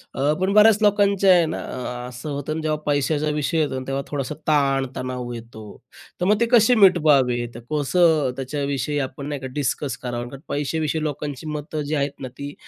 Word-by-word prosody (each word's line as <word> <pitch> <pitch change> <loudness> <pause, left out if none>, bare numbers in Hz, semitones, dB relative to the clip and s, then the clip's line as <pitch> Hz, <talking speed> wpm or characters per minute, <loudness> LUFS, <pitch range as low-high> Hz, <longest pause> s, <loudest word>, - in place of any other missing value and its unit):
अ, 140 +3 +1
पण 190 +1 +1
बऱ्याच 215 0 +6
लोकांचे 200 -1 +3
आहे 175 -2 +6
ना 160 - -4 0.5
असं 125 +4 -8
होतं, 155 +3 -3
जेव्हा 155 -1 -1
पैशाचा 145 +1 +1
विषय 150 +3 -1
येतो 135 -4 -1
तेव्हा 135 0 -1
थोडासा 145 0 -4
ताण-तणाव 135 -4 0
येतो. 115 -2 -10 0.6
तर - - +2
मग 205 +2 +3
ते - - +5
कसे 240 +1 +6
मिटवावे? 145 - +4
तर - - -7
कसं 150 -2 +2
त्याच्याविषयी 140 +1 -2
आपण 135 +1 -5
नाही 145 -2 -4
का 130 - -4
डिस्कस 140 +1 -2
करावं? 120 -1 -4
कारण 135 +1 -11
पैश्याविषयी 155 +2 -1
लोकांची 145 0 -4
मतं 150 0 -4
जी 150 +2 -2
आहेत 140 0 -2
ना 130 - -4
ती 140 0 -6
145 Hz, 175 wpm, -22 LUFS, 135-160 Hz, 0.6 s, बऱ्याच